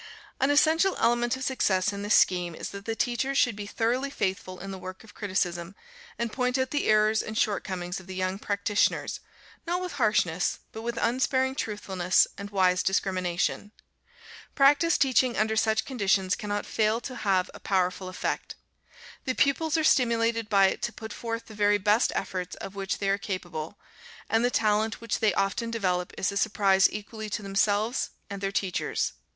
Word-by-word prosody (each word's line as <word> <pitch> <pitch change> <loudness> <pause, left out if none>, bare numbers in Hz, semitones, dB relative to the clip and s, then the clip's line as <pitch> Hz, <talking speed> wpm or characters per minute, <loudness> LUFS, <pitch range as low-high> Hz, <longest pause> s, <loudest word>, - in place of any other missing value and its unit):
An 270 - +2
essential 320 +6 +3
element 240 +1 +2
of 260 - -6
success 205 -7 +1
in 200 - -5
this 205 +1 +2
scheme, 175 -2 +3
is - - -6
that 200 0 -9
the 225 - -2
teachers 255 +4 -1
should 245 -6 +3
be 205 0 -6
thoroughly 245 +6 0
faithful 190 -6 -3
in 195 +1 -7
the 190 - -7
work 185 +2 -9
of 225 - -15
criticism, 185 -3 -2 0.4
and 235 -1 -3
point 250 0 0
out 260 0 -1
the 290 - 0
errors 215 0 +4
and 215 0 -6
shortcomings 185 -4 -1
of 190 - -15
the 190 - -7
young 185 +1 -2
practitioners, 205 0 0 0.5
not 350 +1 0
with 365 -1 -4
harshness, 180 -6 +2
but 220 - -7
with 235 +1 -4
unsparing 260 +2 +1
truthfulness 190 -7 +1
and 200 0 -7
wise 185 -2 +2
discrimination. 185 +1 -1 0.8
Practice 290 +4 +4
teaching 255 -2 +2
under 220 +1 +1
such 220 0 +2
conditions 195 -6 +1
cannot 205 0 -3
fail 220 +1 +1
to 255 +1 -7
have 190 -4 +1
a - - -11
powerful 185 -1 0
effect. 185 - -3 0.7
The 255 - -1
pupils 310 +3 +2
are 315 - +1
stimulated 230 -5 +2
by 195 -2 +5
it - - -5
to 235 - -2
put 220 -2 -8
forth 230 -1 -4
the 220 - -12
very 205 0 +3
best 210 +4 +2
efforts 180 -1 -3
of 195 - -8
which 195 -1 -3
they 200 - -1
are 200 +1 +1
capable, 175 -3 -5 0.5
and 225 +1 +3
the 245 - +3
talent 220 -1 +1
which 230 -3 -2
they 210 -4 +2
often 195 +4 0
develop 185 -6 -1
is 190 - 0
a 200 - -3
surprise 195 -2 +3
equally 215 +1 -6
to 210 - -4
themselves 205 +4 +1 0.2
and 200 -1 -5
their 195 0 -1
teachers. 190 -2 -1
210 Hz, 180 wpm, -27 LUFS, 190-235 Hz, 0.8 s, by